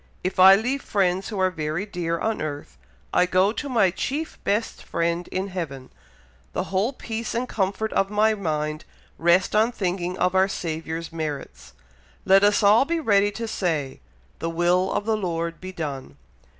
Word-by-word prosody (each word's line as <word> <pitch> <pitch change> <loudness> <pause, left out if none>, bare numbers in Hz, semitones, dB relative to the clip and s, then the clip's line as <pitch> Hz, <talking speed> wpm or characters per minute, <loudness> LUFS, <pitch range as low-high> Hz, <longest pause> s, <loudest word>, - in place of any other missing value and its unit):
If 185 +1 -2
I 190 +1 +10
leave 250 +7 -1
friends 190 -4 0
who 210 - -5
are 185 -1 +2
very 155 +3 -3
dear 175 -4 -2
on 220 +4 -2
earth, 145 -1 -5 0.4
I 180 - +4
go 185 +2 +3
to 285 +5 -5
my 215 -8 +3
chief 295 - -4
best 210 +3 -1
friend 170 +1 -2
in 190 +2 -3
heaven. 145 -8 -6 0.6
The - - -1
whole 200 +7 +2
peace 230 -3 -5
and 245 +2 -1
comfort 205 +1 -1
of 195 - +1
my 215 +1 +3
mind 155 -6 -2 0.4
rest 175 +4 +3
on 220 +3 +4
thinking 180 -4 -2
of 180 - +1
our 190 0 +4
Saviour's 165 -2 -4
merits. 155 -4 -6 0.5
Let 195 +1 +6
us 205 +1 +4
all 210 +5 +6
be 330 +4 -1
ready 205 -8 +3
to 230 +2 -4
say, 160 -10 -2 0.4
'the 165 - -2
will 175 +3 +2
of 205 - -1
the 220 0 +1
Lord 170 -4 -3
be 185 0 -6
done.' 140 - -6
185 Hz, 175 wpm, -24 LUFS, 165-210 Hz, 0.6 s, I